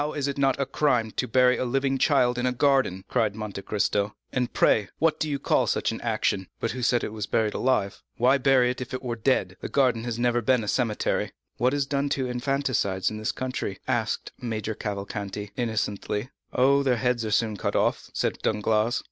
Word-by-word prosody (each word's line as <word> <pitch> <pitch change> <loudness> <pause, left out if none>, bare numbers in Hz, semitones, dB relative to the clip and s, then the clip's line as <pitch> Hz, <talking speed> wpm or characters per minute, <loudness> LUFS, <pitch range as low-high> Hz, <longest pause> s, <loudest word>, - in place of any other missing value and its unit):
is 145 -2 -1
it 140 - -2
not 135 -1 +2
a 140 - +1
crime 125 -5 +1
to 125 - -2
bury 125 +2 +4
a - - 0
living 135 +2 0
child 125 -4 +3
in 125 - +1
a - - +2
garden?" 130 -8 +2
cried 110 -5 0
Monte 105 -3 -5
Cristo. 100 +1 0 0.2
"And 125 -1 0
pray 105 -4 +3
what 160 0 +2
do 155 - -1
you 140 - 0
call 140 - +1
such - - 0
an - - -6
action?" 95 -2 0
"But 115 - -1
who 125 - -5
said 120 0 +2
it 105 - -4
was 105 -2 -4
buried 110 -2 +1
alive?" 105 -7 0 0.2
"Why 130 +4 +4
bury 130 -2 +4
it 125 - -6
there - - -7
if 115 - -14
it 130 - -6
were 120 -2 -2
dead? 130 +4 0
This - - -5
garden 125 -5 +2
has 120 -2 -3
never 120 0 +1
been 125 +1 +2
a - - -6
cemetery." 115 -2 0 0.2
"What 125 +3 +2
is 140 -1 +1
done 140 0 -1
to 130 - -1
infanticides 125 -7 0
in 110 - -5
this 110 - -1
country?" 130 -6 -4
asked 120 -4 -1
Major 110 -2 -3
Cavalcanti 100 0 -5
innocently. 110 -1 -2 0.2
"Oh, 140 +2 +4
their 130 -3 +2
heads 125 -1 0
are 110 - -2
soon 110 0 +1
cut 100 - -2
off," - - +1
said - - -1
Danglars. 110 +2 +1
120 Hz, 215 wpm, -26 LUFS, 110-130 Hz, 0.2 s, bury